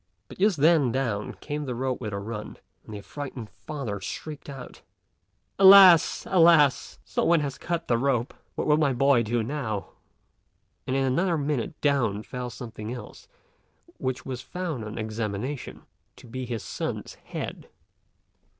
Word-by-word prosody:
But - - -13
just 200 -2 +3
then 150 -3 +4
down 115 -6 -2
came 150 0 -4
the 125 -3 -3
rope 130 +1 -2
with 110 -3 -4
a 100 - -3
run, 105 +1 -6 0.3
and - - -12
the 105 - -6
affrighted 125 0 -7
father 120 -10 -6
shrieked 150 +9 -7
out, 135 -3 -9 0.8
"Alas! 190 -4 +8
alas! 165 -6 +4
some - - -1
one 170 -2 +4
has 140 -2 -4
cut 170 -1 -3
the 120 -1 +2
rope: 130 -2 0 0.2
what - - -2
will 150 0 +4
my 150 -4 +2
boy 135 0 +4
do 115 +1 0
now?" 110 -6 -3 1.0
and 130 - 0
in 135 - +2
another 170 +7 +1
minute 145 0 -2
down 120 -8 +1
fell 125 +1 -5
something 115 -2 -7
else, 125 - -9 0.7
which 130 -1 -3
was 130 -2 -5
found 165 -5 -4
on 105 0 -7
examination 110 +4 -4 0.3
to 125 - -15
be 125 +2 -6
his 115 -3 -4
son's - - -4
head. - - -7
130 Hz, 155 wpm, -26 LUFS, 115-150 Hz, 1.0 s, Alas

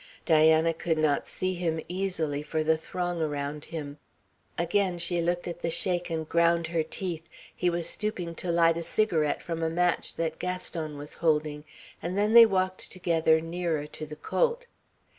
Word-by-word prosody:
Diana 160 +1 +5
could 165 0 -1
not 155 -2 +1
see 185 0 -2
him 170 -2 -1
easily 175 -6 -2
for 155 +1 -2
the 160 +1 +3
throng 175 +1 -3
around 145 -1 -3
him. 150 -3 -6 0.6
Again 180 +1 +1
she 170 0 0
looked 175 +1 -1
at 175 0 -6
the 170 - -1
Sheik 175 +1 0
and 160 -1 -3
ground 170 0 +3
her 165 0 0
teeth. 165 0 -4 0.3
He 180 - +1
was 170 -1 -2
stooping 185 -4 -2
to 175 +1 -3
light 165 -1 +4
a - - -2
cigarette 165 -5 +1
from 165 -1 -4
a 165 - +1
match 175 +1 +1
that 160 -1 -2
Gaston 170 -4 -3
was 145 +1 -7
holding, 150 -2 0 0.4
and 180 +3 -3
then 210 +2 +2
they 230 -1 +10
walked 185 -2 -1
together 165 -3 +2
nearer 165 -2 -2
to 155 +1 -8
the 150 - -8
colt. 485 - 0
165 Hz, 175 wpm, -28 LUFS, 160-180 Hz, 0.6 s, they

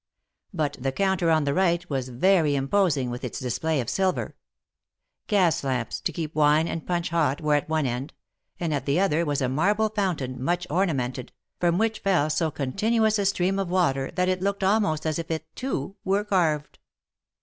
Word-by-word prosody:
But 155 -6 -2
the 135 +2 -1
counter 190 +1 +1
on 160 -1 +3
the 140 -1 0
right 175 0 +1
was 135 -3 -3
very 155 +3 +3
imposing 140 -3 +1
with 120 - -6
its - - -4
display 150 +5 -1
of 120 - -3
silver. 190 +4 -1 0.9
Gas 180 -8 +2
lamps, 125 -4 -2
to - - -1
keep 160 -2 -5
wine 155 +1 +3
and 165 -2 -5
punch 175 -1 -1
hot, 155 -5 +1
were 150 -1 +1
at 145 +1 0
one 160 -2 +1
end, 125 +3 -3 0.5
and 165 -3 -1
at 140 -2 -3
the 140 +5 +2
other 170 -4 +2
was 145 -2 -1
a - - +2
marble 205 +11 +1
foun 200 -4 0
tain, 130 -1 -5
much 175 +4 0
ornamented, 135 -8 -1 0.3
from 175 -1 +2
which 220 +1 0
fell 175 -6 +1
so 160 +1 +1
continuous 215 - +1
a 200 - +2
stream 195 0 +1
of 195 -3 -2
water 150 -8 +1
that 180 0 +1
it 185 -1 0
looked 200 0 -1
almost 190 -6 +1
as 155 +1 -1
if 165 - -6
it, 160 -1 -3
too, 200 - -3
were 195 +2 +1
carved. 165 -7 0
165 Hz, 195 wpm, -25 LUFS, 140-190 Hz, 0.9 s, on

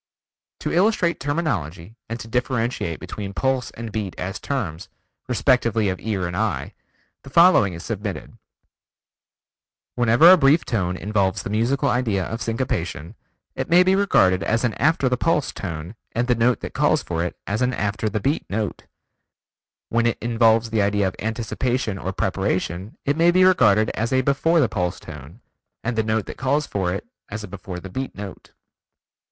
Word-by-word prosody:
To - - -2
illustrate 180 -2 +2
terminology 110 - -3
and 115 +1 -4
to - - -9
differentiate 120 -7 -1
between 100 +2 -7
Pulse 130 0 0
and 115 -1 -8
Beat 100 -3 -4
as 95 +2 -4
terms, 95 - -4 0.4
respectively 115 -4 +2
of 95 - -3
ear 100 -5 -2
and 85 0 -4
eye, - - -2 0.5
the - - -11
following 170 - +5
is 85 - -8
submitted: 105 -3 -5 1.6
Whenever 120 +8 +6
a 185 - +8
brief 150 +1 +4
tone 90 -6 -1
involves 100 -2 0
the - - -5
musical 125 +6 +1
idea 120 -7 0
of 115 +1 -5
syncopation, 90 - -3 0.4
it - - -4
may 175 +2 +6
be 185 +1 +3
regarded 95 - +3
as 115 +4 0
an 120 -3 +1
after 155 -2 +3
the 125 0 +1
pulse 150 +1 +1
tone 85 -1 -6 0.2
and 120 +2 0
the 125 - +4
note 120 +1 +2
that - - -6
calls - - +2
for 85 -1 -2
it 90 - -4
as 110 +4 -2
an 125 0 +2
after 105 -1 -1
the 105 +1 -2
beat 140 +9 -1
note; 105 0 -3 1.0
when 115 0 +2
it 115 - 0
involves 115 -1 +2
the 110 -2 +2
idea 100 0 +2
of 95 - -4
anticipation 115 0 -2
or 95 - -3
preparation 95 +1 -2
it 140 - +1
may 165 +2 +4
be 185 +1 +4
regarded 110 - +4
as 115 +3 -2
a 130 0 +3
before 155 +6 +2
the 135 - +4
pulse 90 -4 -2
tone, 75 - -11 0.4
and 125 0 -2
the 110 - +2
note 110 -1 -1
that - - -8
calls 140 +3 +1
for 95 -7 -2
it, 90 - -4 0.2
as 105 +1 -5
a - - -6
before 95 -2 -7
the 95 - -9
beat 130 +8 -5
note. 100 -1 -9
110 Hz, 175 wpm, -22 LUFS, 95-130 Hz, 1.6 s, a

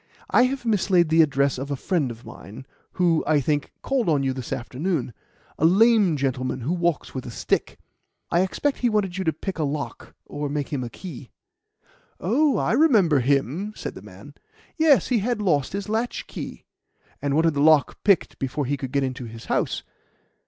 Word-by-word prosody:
I 250 - +5
have 265 -1 -3
mislaid 190 -6 +2
the 160 +1 +5
address 140 -3 +2
of 135 +2 -5
a 140 - -1
friend 150 -1 -1
of 115 0 -10
mine, 110 +7 -11 0.3
who, 170 -3 +2
I 155 -2 +4
think, 145 +1 -1
called 260 -8 0
on 145 -3 +2
you 135 -1 0
this 130 -3 -7
afternoon 135 +2 -2 0.5
a - - -2
lame 200 -2 +5
gentleman 130 -1 -2
who 145 +9 -1
walks 170 -3 -1
with 130 - -4
a - - -5
stick. 115 - -2 0.5
I 170 - +3
expect 270 +9 -1
he 245 - +2
wanted 195 -4 -1
you - - -1
to 160 - +3
pick 175 +4 -6
a - - +1
lock 145 +1 -5
or 145 0 -4
make 145 -1 -3
him 135 -4 -2
a 120 - -5
key." 145 -4 -9 0.9
"Oh, 270 - +2
I - - 0
remember 220 - +4
him!" 140 - 0
said - - -6
the - - -11
man. - - -13 0.4
"Yes, 315 -4 +4
he 245 -3 +2
had 235 +2 -1
lost 160 -9 +1
his 200 -1 -4
latchkey, 225 +3 -4 0.6
and 145 -1 0
wanted 160 0 +3
the 140 - -1
lock 155 -1 +4
picked 200 -4 +2
before 135 +2 -2
he 140 +3 -1
could 130 -1 -6
get 140 0 +1
into 130 -1 -4
his 115 0 -10
house. - - -1
155 Hz, 190 wpm, -24 LUFS, 135-200 Hz, 0.9 s, I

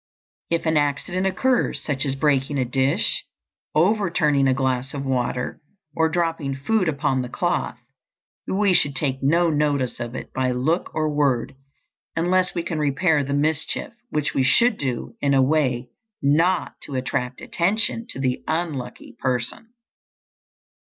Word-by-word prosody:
If 170 0 0
an 160 -1 +2
accident 150 +6 0
occurs, 255 +6 +1
such 140 -1 -1
as 135 - -1
breaking 140 -1 +1
a 130 - +1
dish, 130 +3 +1 0.5
overturning 165 -6 +3
a 130 - +4
glass 130 0 -1
of 140 -1 -4
water, 125 -1 -1 0.3
or 160 0 +3
dropping 165 -5 -1
food 180 +7 +1
upon 140 -3 0
the 125 - -5
cloth, 175 -3 -1 0.7
we 200 0 +2
should 145 -6 +2
take 135 -2 -1
no 165 +5 +3
notice 145 -5 0
of 120 0 -5
it - - -7
by 130 -1 0
look 155 +8 0
or 155 0 +1
word 140 -5 +1 0.6
unless 180 +3 +1
we 170 - -1
can 165 -2 -3
repair 150 +1 +2
the 140 +1 -2
mischief, 155 +8 -1 0.2
which 150 +1 -1
we - - +2
should 235 - +4
do 130 - -3
in 140 -1 +3
a 135 - +5
way 130 -4 +1 0.3
not 165 +6 +1
to 140 - -7
attract 125 -1 -2
attention 215 +6 0
to - - -6
the 130 -2 -1
unlucky 145 -9 -3
person. 125 - -2
145 Hz, 150 wpm, -23 LUFS, 130-170 Hz, 0.7 s, a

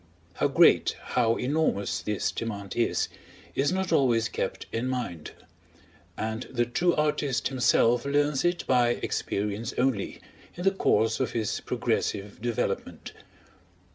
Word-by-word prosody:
How - - +1
great, - - +5
how 115 -2 +1
enormous, 125 - 0
this 105 +3 -1
demand 100 -4 -5
is, 120 - +1 0.5
is 140 +2 +1
not 185 -2 -1
always 120 -6 +3
kept - - -3
in 115 +3 -2
mind; 120 -12 -3 0.9
and 110 +2 -3
the 120 -2 0
true 170 +9 +1
artist 150 -5 0
himself 120 -2 +3
learns 145 0 +1
it 175 0 0
by 120 -2 +3
experience 105 +4 -2
only, 125 -6 0 0.4
in 175 - -6
the 195 - +4
course 110 - +2
of 130 - -1
his 110 -3 -1
progressive 100 +1 -2
development. 120 -1 -3
120 Hz, 130 wpm, -27 LUFS, 110-140 Hz, 0.9 s, great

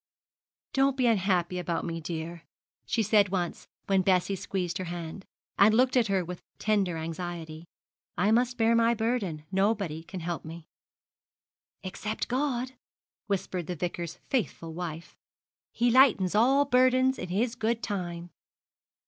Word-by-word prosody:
'Don't 270 -1 +2
be 255 - +2
unhappy 185 -5 +2
about 175 -1 -2
me, 165 -1 -4
dear,' 165 +1 -5 0.5
she 225 - +1
said 205 -1 +4
once 180 -2 -3 0.2
when 195 -1 +3
Bessie 185 +1 +2
squeezed 180 -2 -3
her 185 - -3
hand, 175 +2 -6 0.3
and 215 +2 +6
looked 255 +2 +3
at 240 -3 +4
her 190 -3 +1
with 180 +1 -7 0.2
tender 200 -6 +1
anxiety; 165 0 -6 0.5
'I 200 +5 +3
must 245 +2 +2
bear 225 -1 +3
my 230 0 +4
burden. 215 -9 -1
Nobody 195 -5 0
can 185 +3 -8
help 170 0 -3
me.' 165 0 -9 1.2
'Except 195 +3 -4
God,' 255 -1 -1 0.6
whispered 185 -4 -2
the 180 - -3
Vicar's 175 0 -4
faithful 175 -10 -2
wife. 170 -1 -7 0.5
'He 240 +1 +2
lightens 230 -8 +5
all 265 +7 +4
burdens, 255 0 +3
in 180 - -5
His 225 +6 0
good 230 -1 -1
time.' 175 -4 -4
190 Hz, 140 wpm, -28 LUFS, 175-230 Hz, 1.2 s, and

